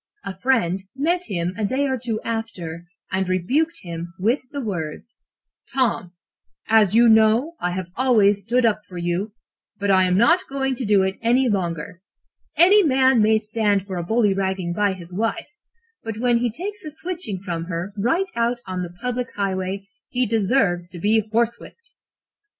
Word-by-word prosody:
A 195 - -5
friend 195 -8 +1
met 345 +6 0
him 175 - -2
a 220 - -2
day 260 +7 0
or 265 - 0
two 230 -3 -3
after, 180 -8 -5 0.2
and 190 -1 -1
rebuked 260 - 0
him 170 0 -7
with 225 +9 +1
the 285 - -5
words: 195 - -5 0.6
"'Tom, 235 -9 0 0.6
as 215 -3 +4
you 235 +1 +6
know, 220 +7 +4
I 180 - -1
have 180 -1 -5
always 215 -6 +3
stood 240 +5 +1
up 215 -1 +1
for 180 - -11
you, 175 +5 -2 0.5
but 200 0 +1
I 185 -1 +5
am 180 0 +2
not 240 - +4
going 270 -1 -1
to 255 - -3
do 200 -2 +3
so 190 - -3
any 245 +3 +3
longer. 180 -3 -2 0.6
Any 390 +5 +7
man 265 - +4
may 220 +1 +4
stand 210 -2 0
for 190 -2 -5
a 175 - -2
bullyragging 190 -3 0
by 205 +1 +1
his 180 -1 -11
wife, 225 - -2 0.5
but 225 -1 -5
when 240 0 +2
he 240 0 +1
takes 400 - -6
a 310 - -6
switching 320 - -5
from 170 -3 -4
her 180 +3 -4
right 330 - 0
out 235 +1 0
on 185 -1 -4
the 175 - -4
public 250 0 -2
highway, 195 0 -2 0.2
he 250 0 0
deserves 200 -5 +1
to 175 -1 -9
be 215 +5 +3
horsewhipped.' 235 - -2
215 Hz, 175 wpm, -22 LUFS, 185-250 Hz, 0.6 s, Any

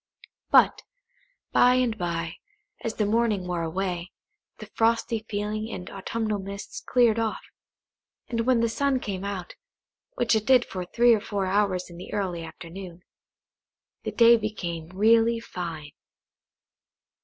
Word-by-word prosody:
But, - - +5 0.7
by 250 0 +5
and 250 -3 +1
by, 170 -4 -3 0.5
as 225 - -3
the 215 - +1
morning 215 -3 +1
wore 175 -1 -2
away, 175 +1 -3 0.5
the - - -9
frosty 225 -1 0
feeling 215 +1 -3
and 180 - -7
autumnal 215 +2 -2
mists 200 +1 -7
cleared 235 -3 +3
off; 225 -1 -2 0.8
and 230 0 -2
when 250 -3 +4
the 230 - +3
sun 270 +3 +1
came 195 -5 -4
out, 195 -3 -5 0.6
which 240 -1 +2
it 220 -1 +1
did 255 -2 +6
for 185 -1 -5
three 240 +3 +5
or 215 - +1
four 205 -3 -2
hours 190 -1 +1
in 175 - -12
the 180 - -9
early 180 -5 -2
afternoon, 175 +1 -9 1.0
the - - -4
day 235 0 +6
became 175 -7 -4
really 225 +4 +4
fine. 165 -8 -6
205 Hz, 140 wpm, -26 LUFS, 180-230 Hz, 1.0 s, did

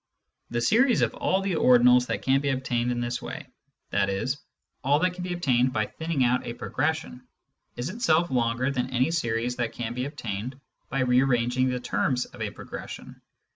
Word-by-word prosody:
The 120 0 -1
series 240 - +4
of - - +1
all 190 +1 0
the 195 -1 -1
ordinals 125 -1 +6
that - - -3
can 135 +1 +3
be 140 - 0
obtained 125 -2 0
in 120 0 -1
this 120 0 -2
way, - - -6 0.5
i.e. 100 -1 +1 0.6
all 140 +3 +4
that 180 +3 +1
can 180 0 -6
be 180 0 -3
obtained 130 -7 +2
by 110 -1 +1
thinning 160 -1 -2
out 125 +1 +2
a 120 - -4
progression, 145 -3 -2 0.5
is 120 +4 -3
itself 170 - +2
longer 125 +1 +1
than 125 -2 -1
any 130 +5 +1
series 120 -6 -1
that 120 -2 -2
can 120 -1 -4
be 125 +1 -2
obtained 125 -3 -5 0.3
by 135 - -1
re 125 0 +4
arranging 130 0 +2
the 125 0 -1
terms 125 +1 0
of 120 - -13
a 110 - -1
progression. - - -9
125 Hz, 185 wpm, -26 LUFS, 120-145 Hz, 0.6 s, ordinals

